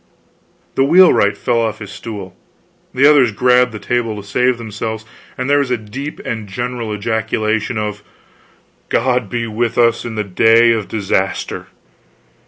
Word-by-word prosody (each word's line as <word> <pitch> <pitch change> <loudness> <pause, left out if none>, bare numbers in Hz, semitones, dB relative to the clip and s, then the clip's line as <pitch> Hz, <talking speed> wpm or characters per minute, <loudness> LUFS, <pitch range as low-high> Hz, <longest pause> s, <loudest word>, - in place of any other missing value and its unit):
The 135 - +2
wheelwright 140 - +5
fell 120 +2 0
off 110 -2 -2
his 105 -1 -9
stool, 105 -3 -8 0.6
the 130 +2 +2
others 140 -6 +5
grabbed 125 +3 +3
the 110 - -6
table 115 +1 -2
to 100 - -11
save 125 +4 +1
themselves, 110 -1 -5 0.3
and 130 - -3
there 145 +1 +3
was 140 -2 -1
a 125 - +1
deep 130 +8 -7
and 110 -3 -4
general 120 +2 -4
ejaculation 110 +1 -1
of: 105 -1 -3 0.9
"God 125 -3 +1
be 120 +1 -2
with 115 +1 -2
us 115 -1 +3
in 115 -2 -6
the 105 - -1
day 115 +4 +4
of 110 -3 -1
disaster!" 95 -3 -2
115 Hz, 155 wpm, -17 LUFS, 105-125 Hz, 0.9 s, wheelwright